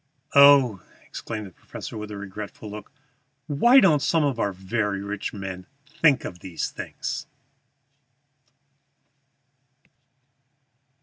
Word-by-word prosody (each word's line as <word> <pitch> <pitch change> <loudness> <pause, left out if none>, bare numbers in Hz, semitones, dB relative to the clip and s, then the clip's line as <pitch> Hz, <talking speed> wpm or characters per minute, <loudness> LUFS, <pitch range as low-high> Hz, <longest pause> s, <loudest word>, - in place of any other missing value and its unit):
"Oh," 140 -8 +7 0.2
exclaimed 110 -2 -6
the 95 - -11
professor, - - -9
with 105 -1 -6
regretful 100 +1 -8
look, 105 -1 -9 0.5
"why 200 - +5
don't 160 - +4
some 165 +2 +2
of 135 -5 0
our 100 - 0
very 100 +2 -2
rich 100 0 -4
men 95 -2 -7 0.2
think 150 -1 +2
of 90 - -7
these 90 -3 -4
things!" - - -6
105 Hz, 105 wpm, -24 LUFS, 100-140 Hz, 0.5 s, Oh